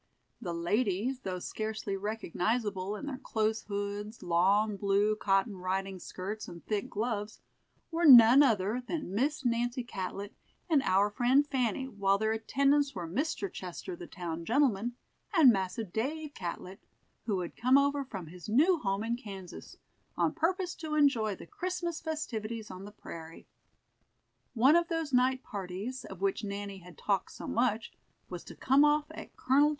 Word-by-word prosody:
The 180 Hz, -6 st, -3 dB
ladies, 210 Hz, +7 st, 0 dB
though 190 Hz, -7 st, -4 dB
scarcely 215 Hz, +1 st, -4 dB
recognizable 205 Hz, 0 st, -2 dB
in 290 Hz, -, -6 dB
their 270 Hz, -3 st, -5 dB
close 220 Hz, -4 st, -1 dB
hoods, 205 Hz, +1 st, -4 dB
long 195 Hz, +5 st, +3 dB
blue 200 Hz, +2 st, +2 dB
cotton 195 Hz, 0 st, +1 dB
riding 190 Hz, +1 st, -2 dB
skirts, 195 Hz, +5 st, -6 dB
and 170 Hz, -2 st, -10 dB
thick 210 Hz, -2 st, -2 dB
gloves, 215 Hz, -1 st, -3 dB, 0.5 s
were 330 Hz, 0 st, +2 dB
none 245 Hz, 0 st, +10 dB
other 225 Hz, -3 st, +2 dB
than 245 Hz, -, -4 dB
Miss 275 Hz, +6 st, 0 dB
Nancy 240 Hz, +1 st, 0 dB
Catlett 200 Hz, -2 st, -5 dB, 0.3 s
and 310 Hz, -5 st, +4 dB
our 200 Hz, -2 st, +3 dB
friend 255 Hz, +6 st, +3 dB
Fanny, 260 Hz, -2 st, -1 dB
while 200 Hz, -5 st, +1 dB
their 220 Hz, +1 st, 0 dB
attendants 275 Hz, +5 st, +2 dB
were 175 Hz, -3 st, -4 dB
Mr. 315 Hz, -, -2 dB
Chester, 185 Hz, -, -6 dB
the 350 Hz, 0 st, -9 dB
town 170 Hz, -3 st, -5 dB
gentleman, 240 Hz, -, +1 dB, 0.4 s
and 300 Hz, -7 st, +8 dB
Massa 190 Hz, +2 st, -2 dB
Dave 280 Hz, -, -3 dB
Catlett, 180 Hz, +2 st, -6 dB, 0.5 s
who 195 Hz, -4 st, 0 dB
had 175 Hz, -, -6 dB
come 255 Hz, +3 st, +4 dB
over 280 Hz, 0 st, +2 dB
from 195 Hz, -9 st, -7 dB
his 175 Hz, +5 st, -10 dB
new 315 Hz, -, +4 dB
home 195 Hz, -2 st, -1 dB
in 230 Hz, +1 st, 0 dB
Kansas, 195 Hz, -7 st, -9 dB, 0.4 s
on -, -, +2 dB
purpose 360 Hz, +2 st, 0 dB
to 310 Hz, -2 st, -4 dB
enjoy 235 Hz, -9 st, +3 dB
the -, -, -11 dB
Christmas 345 Hz, -, -3 dB
festivities 230 Hz, -9 st, -4 dB
on 185 Hz, +1 st, -8 dB
the 205 Hz, -, -9 dB
prairie. 165 Hz, -5 st, -10 dB, 1.1 s
One 260 Hz, +7 st, +6 dB
of 340 Hz, 0 st, +3 dB
those 325 Hz, -4 st, -2 dB
night 255 Hz, +1 st, +3 dB
parties, 200 Hz, +6 st, -5 dB
of 190 Hz, -1 st, -10 dB
which 195 Hz, +1 st, 0 dB
Nanny 200 Hz, -1 st, -5 dB
had 175 Hz, -2 st, -14 dB
talked 200 Hz, -2 st, -1 dB
so -, -, -8 dB
much, 230 Hz, -2 st, 0 dB, 0.4 s
was 180 Hz, -2 st, -6 dB
to -, -, -10 dB
come 270 Hz, +3 st, +4 dB
off 295 Hz, 0 st, +4 dB
at -, -, -10 dB
Col. 280 Hz, +3 st, +4 dB
220 Hz, 160 wpm, -31 LUFS, 195-270 Hz, 1.1 s, none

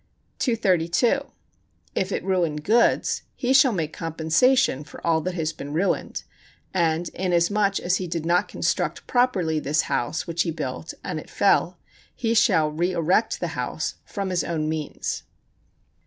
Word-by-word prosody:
232. 225 Hz, -, +1 dB, 0.6 s
If 190 Hz, +1 st, -1 dB
it -, -, -2 dB
ruin 180 Hz, -5 st, +1 dB
goods, 215 Hz, +11 st, +2 dB
he 255 Hz, 0 st, +1 dB
shall 265 Hz, -1 st, +6 dB
make 160 Hz, -6 st, -2 dB
compensation 165 Hz, -, +2 dB
for 150 Hz, -, -12 dB
all 160 Hz, -1 st, +3 dB
that 185 Hz, +2 st, -3 dB
has 160 Hz, -2 st, -1 dB
been 145 Hz, -1 st, -7 dB
ruined, 180 Hz, +6 st, -1 dB, 0.5 s
and 170 Hz, -2 st, +1 dB
inasmuch 190 Hz, +3 st, +1 dB
as 180 Hz, +1 st, +1 dB
he 185 Hz, -, -4 dB
did 165 Hz, -1 st, -3 dB
not 175 Hz, +1 st, +2 dB
construct -, -, -1 dB
properly 190 Hz, -11 st, +1 dB
this 150 Hz, +1 st, +1 dB
house 120 Hz, +7 st, -2 dB
which 170 Hz, -1 st, -1 dB
he 170 Hz, -, 0 dB
built 155 Hz, 0 st, -5 dB
and -, -, -3 dB
it -, -, -12 dB
fell, -, -, +2 dB, 0.4 s
he 230 Hz, -2 st, 0 dB
shall 175 Hz, -8 st, +3 dB
reërect 175 Hz, +6 st, +1 dB
the -, -, -3 dB
house -, -, -3 dB
from 195 Hz, -3 st, -4 dB
his 180 Hz, -, +1 dB
own 155 Hz, -2 st, -2 dB
means. 155 Hz, -1 st, -3 dB
175 Hz, 150 wpm, -24 LUFS, 160-200 Hz, 0.6 s, shall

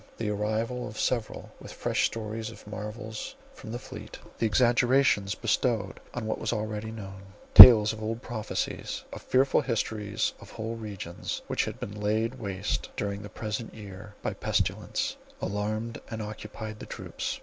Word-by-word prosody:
The 110 Hz, -2 st, -2 dB
arrival 110 Hz, +4 st, -2 dB
of 105 Hz, 0 st, -8 dB
several 120 Hz, -4 st, -2 dB
with -, -, -10 dB
fresh -, -, +1 dB
stories 110 Hz, 0 st, -5 dB
of 110 Hz, -1 st, -13 dB
marvels, 105 Hz, +1 st, -6 dB, 0.2 s
from 110 Hz, -, -10 dB
the 120 Hz, -, -3 dB
fleet; -, -, -9 dB, 0.2 s
the 115 Hz, -, +2 dB
exaggerations 120 Hz, -3 st, +3 dB
bestowed 115 Hz, -3 st, 0 dB, 0.2 s
on 120 Hz, -2 st, -3 dB
what 110 Hz, -, -2 dB
was 115 Hz, -, -1 dB
already 110 Hz, -1 st, -3 dB
known; 95 Hz, -3 st, -8 dB, 0.3 s
tales 110 Hz, -3 st, +12 dB
of 110 Hz, -, -8 dB
old 115 Hz, +3 st, -3 dB
prophecies, 110 Hz, -3 st, -4 dB
of -, -, -7 dB
fearful 135 Hz, +1 st, +3 dB
histories 105 Hz, -4 st, -1 dB
of -, -, -13 dB
whole 110 Hz, +1 st, -4 dB
regions 100 Hz, -6 st, -6 dB
which -, -, 0 dB
had -, -, -6 dB
been 105 Hz, +1 st, -6 dB
laid 110 Hz, +4 st, 0 dB
waste 100 Hz, -2 st, -3 dB
during 100 Hz, 0 st, -3 dB
the 105 Hz, -, -8 dB
present 110 Hz, +2 st, -5 dB
year 100 Hz, -1 st, -10 dB
by -, -, -1 dB
pestilence, -, -, -1 dB, 0.2 s
alarmed 110 Hz, +3 st, -3 dB
and 110 Hz, -1 st, -5 dB
occupied 110 Hz, 0 st, -7 dB
the -, -, -9 dB
troops. -, -, -5 dB
110 Hz, 160 wpm, -28 LUFS, 105-115 Hz, 0.3 s, tales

